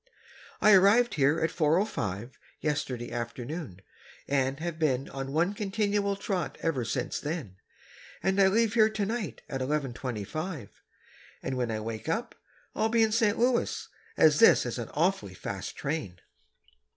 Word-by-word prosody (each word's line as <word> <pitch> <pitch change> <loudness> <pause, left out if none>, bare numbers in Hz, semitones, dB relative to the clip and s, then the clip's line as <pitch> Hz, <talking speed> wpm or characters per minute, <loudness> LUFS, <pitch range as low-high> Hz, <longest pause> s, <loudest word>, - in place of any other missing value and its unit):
I 215 - +7
arrived 205 +6 +5
here 145 +2 +3
at 160 0 0
4:05 150 - 0 0.3
yesterday 130 -5 -2
afternoon 120 - -5 0.5
and 135 0 0
have 165 -1 -4
been 135 -4 +1
on 135 0 -5
one 170 +6 +1
continual 205 -1 0
trot 195 -4 -3
ever 150 -7 0
since 125 +2 -2
then, 145 - -5 0.7
and 190 +1 +2
I 190 - +7
leave 220 +3 +2
here 220 -2 +5
tonight 215 - -3
at 135 -1 -4
11:25, 130 - -3 0.7
and 130 - -2
when 125 -2 -1
I 110 -1 -2
wake 110 +6 -5
up 225 +8 -2 0.4
I'll 220 - +1
be 230 0 +4
in 220 - +2
St. 220 -1 +2
Louis, 240 +1 +1 0.3
as 155 -1 +5
this 225 - +7
is 120 0 -3
an 115 - -5
awfully 150 - 0
fast 100 +1 -5
train.... 140 - -3
155 Hz, 145 wpm, -29 LUFS, 125-200 Hz, 0.7 s, I